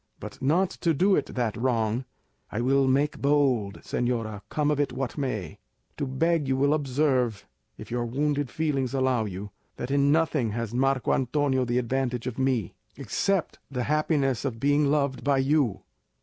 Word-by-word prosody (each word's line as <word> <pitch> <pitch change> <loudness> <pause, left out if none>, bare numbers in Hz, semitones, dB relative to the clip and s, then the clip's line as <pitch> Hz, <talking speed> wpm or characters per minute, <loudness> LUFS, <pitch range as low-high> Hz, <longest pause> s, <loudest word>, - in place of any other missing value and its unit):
But - - -9
not 175 +8 +2
to 165 -2 +2
do 190 +6 +4
it 140 - 0
that 120 -5 -1
wrong, 115 0 0 0.5
I 105 - -2
will 135 +2 +3
make 140 +3 +1
bold, 135 -8 +1
señora, 115 -4 -2
come 150 -1 +1
of 145 - 0
it 145 -3 +1
what 130 0 -3
may, 110 - -3 0.4
to 140 - -2
beg 155 +3 +1
you 130 0 +1
will 140 +2 +3
observe, 130 -6 0 0.3
if - - -10
your 120 0 -1
wounded 145 +2 -1
feelings 140 -3 -1
allow 130 -4 +1
you, 100 +1 -6 0.2
that 120 - -5
in 140 0 +3
nothing 155 -8 +1
has 115 -1 -3
Marco 135 +1 +1
Antonio 130 0 +1
the 120 0 0
advantage 125 -1 -1
of 125 -1 -4
me, 130 -8 0 0.2
except 195 -4 -1
the 125 -3 -2
happiness 145 -4 +1
of 125 -5 -3
being 145 +2 +3
loved 140 -3 0
by 140 -1 +2
you. 135 -4 +1
135 Hz, 170 wpm, -26 LUFS, 120-145 Hz, 0.5 s, do